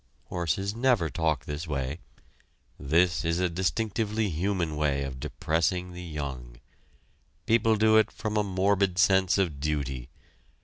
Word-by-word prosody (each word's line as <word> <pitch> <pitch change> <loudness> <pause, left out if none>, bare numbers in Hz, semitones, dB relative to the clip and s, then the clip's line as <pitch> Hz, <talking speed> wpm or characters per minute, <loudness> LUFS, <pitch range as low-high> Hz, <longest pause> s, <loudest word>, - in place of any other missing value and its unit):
Horses 95 +4 -1
never 115 - +2
talk 80 -5 0
this 75 +3 -5
way. 70 +1 -3 0.8
This 85 +5 +2
is 85 +1 0
a 90 - +2
distinctively 105 +4 -1
human 85 -1 -1
way 70 -2 0
of 65 -2 -6
depressing 85 +6 -1
the 90 - -8
young. 70 -7 -6 0.9
People 115 -1 +3
do 110 +1 +4
it 110 - +4
from 110 -1 -4
a 105 - +3
morbid 95 -1 +1
sense 95 +1 +4
of 85 -8 0
duty. 70 -4 -3
90 Hz, 135 wpm, -27 LUFS, 75-100 Hz, 0.9 s, do